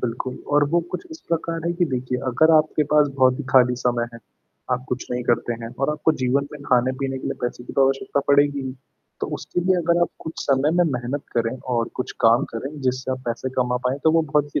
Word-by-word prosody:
बिल्कुल 125 +1 -3 0.2
और 145 0 +5
वो 170 +3 +2
कुछ 180 - -4
इस 320 - -9
प्रकार 165 0 -2
है, 170 - +1
कि 175 0 +1
देखिए 125 -3 -2
अगर 160 +6 +4
आपके 155 0 +3
पास 150 -1 +6
बहुत 130 0 +4
ही 145 - -4
खाली 125 -1 +5
समय 120 -1 +1
है, - - -9 0.5
आप 125 0 0
कुछ 125 0 -3
नहीं 125 0 -1
करते 120 0 +1
हैं 115 - -5
और 135 - +2
आपको 150 +1 +1
जीवन 135 +3 +1
में 150 - -9
खाने 125 -2 +2
पीने 135 -1 -2
के - - -6
लिए - - -2
पैसे 120 0 -3
की - - -8
तो 135 - +4
आवश्यकता 135 +1 0
पड़ेगी 145 0 +4
ही। 130 - -4 0.5
तो - - -1
उसके - - -3
लिए 185 +1 +2
अगर 170 0 +2
आप 175 - +3
कुछ 160 - -6
समय 140 +2 +2
में 175 - +5
मेहनत 125 +3 -3
करें 115 +2 0 0.2
और 115 -1 0
कुछ 125 - -3
काम 115 +4 +5
करें 135 +6 -5
जिससे 130 0 -1
आप 130 - -1
पैसे 120 +3 -2
कमा 125 -1 +1
पाएँ 130 +3 0
तो 160 - +6
वो 165 - +4
बहुत-सी 150 -2 0
135 Hz, 240 wpm, -23 LUFS, 125-150 Hz, 0.5 s, पास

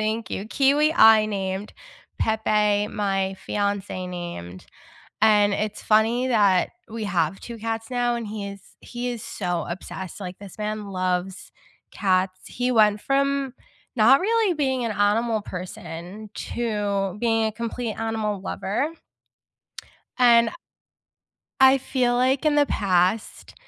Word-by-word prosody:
Thank 220 +1 -2
you. 200 - -4
Kiwi, 285 +5 +3
I 220 -6 +7
named. 195 -1 -3 0.5
Pepe, 210 -2 +2
my 195 -2 -1
fiancé 200 -2 -2
named. 170 - -7 0.6
And 210 -2 +5
it's 210 +1 -3
funny 225 +4 +2
that 205 -6 +3 0.2
we 220 -1 -4
have 180 -2 0
2 235 -1 -8
cats 225 0 -4
now 245 -1 0
and 230 -2 -4
he 205 -1 -5
is 200 -1 -10 0.2
he 245 0 -5
is 235 -3 -5
so 175 -4 -3
obsessed, 185 +1 -7
like, 185 -2 -7
this 200 -1 -11
man 210 -1 -4
loves 185 0 -3 0.4
cats. 185 -1 0
He 250 +1 -1
went 210 -2 +4
from 275 -1 0 0.4
not 245 +5 +6
really 445 -2 +2
being 265 -5 0
an 225 - -1
animal 215 +2 +1
person 180 +2 -8
to 205 -6 -2
being 225 -1 +2
a 220 - 0
complete 230 0 -4
animal 220 -3 -2
lover. 210 +10 -2 1.3
And 235 -2 +6
I - - -13 1.1
I 265 +1 +8
feel 250 -2 0
like 260 +4 +2
in 300 - +3
the 290 - +5
past, 190 0 0
215 Hz, 135 wpm, -24 LUFS, 195-240 Hz, 1.3 s, I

